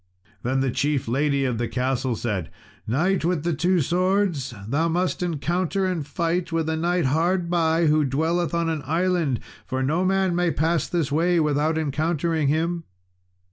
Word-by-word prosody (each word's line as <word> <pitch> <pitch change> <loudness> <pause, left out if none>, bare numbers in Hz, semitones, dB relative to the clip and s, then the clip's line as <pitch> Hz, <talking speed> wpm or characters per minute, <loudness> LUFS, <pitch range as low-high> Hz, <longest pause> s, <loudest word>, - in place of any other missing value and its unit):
Then 130 +2 0
the 135 -1 +1
chief 140 0 0
lady 140 +3 +1
of 125 -3 -1
the 120 - 0
castle 130 0 -1
said, 105 -8 -3 0.4
"Knight 175 - +1
with 170 -3 0
the 170 0 0
two 175 +3 +2
swords, 180 -3 +1 0.2
thou 150 +8 +1
must 180 +3 -1
encounter 175 +4 -1
and 175 -6 -2
fight 170 +1 -1
with 165 -1 0
a 160 - 0
knight 170 +1 0
hard 170 +5 +1
by, 165 -1 +2
who 155 0 +3
dwelleth 165 +6 0
on 170 -1 0
an 160 -2 -1
island, 165 -4 +1 0.3
for 130 +1 -1
no 160 +7 +1
man 190 -1 +1
may 175 0 +2
pass 160 -1 0
this 165 -6 -1
way 170 +3 +2
without 150 +1 +1
encountering 160 +1 0
him." 165 +3 0
160 Hz, 170 wpm, -24 LUFS, 140-175 Hz, 0.4 s, who